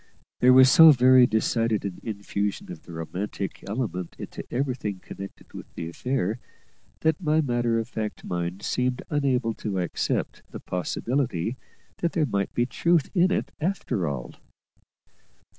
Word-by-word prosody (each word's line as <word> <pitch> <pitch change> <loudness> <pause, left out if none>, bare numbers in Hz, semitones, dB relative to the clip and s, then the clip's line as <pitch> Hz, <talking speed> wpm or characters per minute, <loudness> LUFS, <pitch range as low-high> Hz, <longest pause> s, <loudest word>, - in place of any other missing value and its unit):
There 125 - +6
was 130 0 +8
so 160 -3 +10
very 130 -2 +7
decided 110 -1 +1
an 95 -3 -5
infusion 100 -3 -3
of 85 - -9
the - - -13
romantic 90 +4 -5
element 100 -5 -3
into - - -7
everything 125 -6 -2
connected 100 +1 -10
with - - -10
the 80 - -5
affair, 110 +2 -2 0.6
that 160 +2 +1
my 155 -2 +2
matter 120 -5 +1
of 115 0 -2
fact 110 -3 -5
mind 90 +3 -3
seemed 125 0 -1
unable 130 -5 +1
to 105 -3 -4
accept 90 -3 -2
the - - -8
possibility 115 - -2 0.4
that 170 - 0
there 160 - +2
might 100 -6 -1
be 120 - +2
truth 170 +4 +1
in 185 -1 +4
it - - -1
after 150 - -1
all. 65 -4 -4
115 Hz, 145 wpm, -26 LUFS, 100-130 Hz, 0.6 s, so